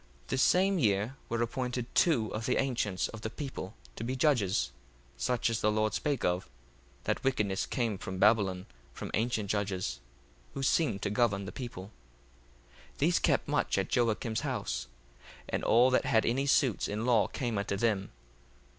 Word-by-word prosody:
1:5 - - -28
The - - 0
same 190 +6 +4
year 105 0 +1
were 115 0 0
appointed 125 +1 -2
two 120 -11 +3
of 110 +2 -3
the 125 - +2
ancients 115 -8 0
of 110 - -9
the 110 - -3
people 120 -6 -6 0.2
to - - -5
be 125 +3 -2
judges, 125 -9 +2 0.4
such 125 -2 0
as 115 -1 -1
the 105 - +3
Lord 110 0 +1
spake 145 -4 -1
of, 90 +1 0 0.5
that - - -1
wickedness 105 -8 0
came 115 -7 -1
from 95 - -5
Babylon 100 -3 +3 0.3
from - - -6
ancient 110 -2 0
judges, 100 -3 -2 0.6
who 135 - -3
seemed 130 -7 +1
to 100 - -1
govern 105 -3 +1
the 90 - -6
people. 105 -4 -7 1.0
1:6 - - -28
These - - +3
kept - - +2
much - - +1
at - - 0
Joacim's 115 -1 +1
house: - - -3 0.6
and - - -2
all 120 +3 +5
that 130 - +2
had 110 -1 +3
any 135 +4 +1
suits 130 -5 +2
in 105 +3 -3
law 120 -4 +4
came 120 -5 -2
unto 100 0 -2
them. 105 -3 0
115 Hz, 170 wpm, -31 LUFS, 100-125 Hz, 1.0 s, all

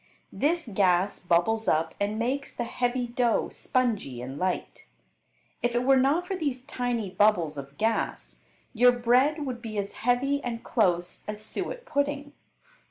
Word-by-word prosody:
This 330 +1 +1
gas 190 -2 +2
bubbles 180 +6 +1
up 160 +1 +2
and 205 +1 -1
makes 260 +5 -2
the 240 - -2
heavy 245 +1 -1
dough 240 -1 +1
spongy 220 - -1
and 130 +3 -6
light. 185 -1 -3 0.7
If 240 0 0
it 240 - +2
were 270 +1 +5
not 280 +7 +3
for 385 - -3
these 280 -8 -2
tiny 240 -6 -2
bubbles 185 -7 +3
of 140 0 -9
gas 225 +1 -1 0.4
your 245 +1 +6
bread 255 +6 +2
would 250 -3 -4
be 220 -3 -6
as 200 -1 -2
heavy 270 +4 +1
and 230 -2 -4
close 180 -6 0
as 210 0 -5
suet - - -5
pudding. 285 - -1
235 Hz, 155 wpm, -27 LUFS, 200-260 Hz, 0.7 s, your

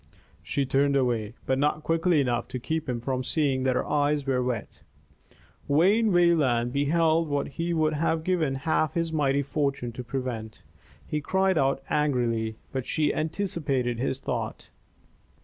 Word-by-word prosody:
She 140 - -1
turned 140 +2 +2
away, 120 -4 0
but 130 0 +1
not 150 +1 +1
quickly 165 0 +2
enough 120 -2 -1
to 130 - -5
keep 160 +3 -3
him 120 -1 -1
from 130 +1 -2
seeing 135 -2 +1
that 130 -1 +2
her - - 0
eyes 145 -1 +1
were 130 -2 +1
wet. 125 -3 -4 0.9
Wayne 200 +9 +4
Wayland 145 -9 +3
beheld 160 +3 +2
what 145 -1 -1
he 165 +4 -3
would 155 -2 +1
have 160 +1 0
given 160 -6 0
half 155 +2 0
his 165 -1 -1
mighty 140 -2 +2
fortune 140 -4 -2
to 125 +2 -7
prevent. 120 -3 -5 0.4
He 150 - -2
cried 190 +2 +1
out 135 0 +1
angrily, 120 -7 0 0.2
but 130 -2 -4
she 150 -2 +1
anticipated 150 - -1
his 130 +1 -1
thought. 120 -5 -4
140 Hz, 155 wpm, -27 LUFS, 125-160 Hz, 0.9 s, Wayne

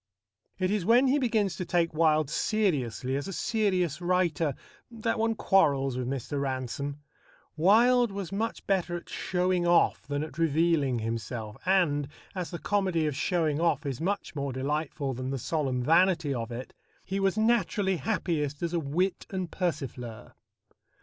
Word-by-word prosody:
It 185 0 0
is 210 -3 0
when 235 +7 +5
he 275 +2 +3
begins 220 - +1
to - - -2
take 170 -1 +1
Wilde 155 -2 +3
seriously 140 - 0
as 140 - -3
a - - -4
serious 185 - 0
writer 175 -5 +1 0.3
that 230 -1 -2
one 225 0 +1
quarrels 140 - +2
with 125 -1 -3
Mr. 140 +2 -3
Ransome. 135 +1 -3 0.6
Wilde 230 +8 +4
was 195 -3 -5
much 220 +3 -3
better 180 -3 0
at 175 - -8
showing 180 -1 0
off 170 -6 +3
than 145 +1 -1
at 155 0 -8
revealing 160 -4 +2
himself, 115 -1 -4
and, 155 -7 +2 0.3
as 180 -3 -4
the 170 - -5
comedy 190 -5 0
of 150 -3 -1
showing 160 -1 0
off 165 -2 +1
is 140 0 -3
much 195 -1 -2
more 140 -1 -2
delightful 140 +1 -2
than 130 +1 -4
the 135 - -2
solemn 130 -2 -1
vanity 165 -1 +3
of 115 -1 -4
it, 120 +2 -7 0.3
he 195 +1 -2
was 195 +1 +1
naturally 210 -4 +2
happiest 150 0 -2
as 170 0 -1
a 170 - +2
wit 170 +6 -1
and 185 -3 -4
persifleur. 130 - -4
165 Hz, 160 wpm, -28 LUFS, 140-190 Hz, 0.6 s, when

